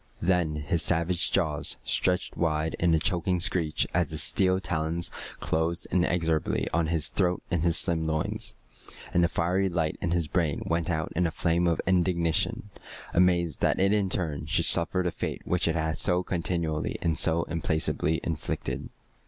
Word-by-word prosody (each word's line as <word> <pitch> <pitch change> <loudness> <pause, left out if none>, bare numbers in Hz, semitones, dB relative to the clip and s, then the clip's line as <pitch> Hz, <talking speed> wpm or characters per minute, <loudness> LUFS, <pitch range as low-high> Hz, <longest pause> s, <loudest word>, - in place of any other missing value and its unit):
Then 85 -4 +1
his 75 +2 -1
savage 85 +1 +1
jaws 80 -6 -1
stretched 90 0 +1
wide 80 -1 0
in 85 -1 +3
a - - +3
choking 90 +2 0
screech 85 -4 0
as 90 +1 +1
the 80 - -4
steel 95 +4 +3
talons 85 -1 -1 0.3
closed 80 +2 0
inexorably 85 -3 +1
on 85 -1 +1
his 80 -2 +1
throat 90 -2 0
and 85 -3 +1
his 85 0 +3
slim 80 -2 +1
loins, 80 -1 -2 0.6
and 90 - +3
the - - +4
fiery 90 +3 0
light 80 -3 -1
in 90 - -1
his 85 -2 0
brain 80 -4 -1
went 85 0 -1
out 80 -2 -2
in 90 +1 +2
a - - -1
flame 85 +1 +1
of 85 -2 +1
indignation, 90 +1 +1 0.4
amazed 85 -3 +2
that - - +2
it 100 +2 +3
in 100 -3 +1
turn 75 -6 -3
should - - +2
suffer 90 +2 +2
the 90 - -1
fate - - -4
which 90 -1 +1
it 80 - +1
had 80 -1 -1
so 90 +1 +3
continually 85 -3 -2
and 80 -2 +1
so 85 +1 +3
implacably 80 0 -1
inflicted. 80 -3 -4
85 Hz, 170 wpm, -27 LUFS, 80-90 Hz, 0.6 s, the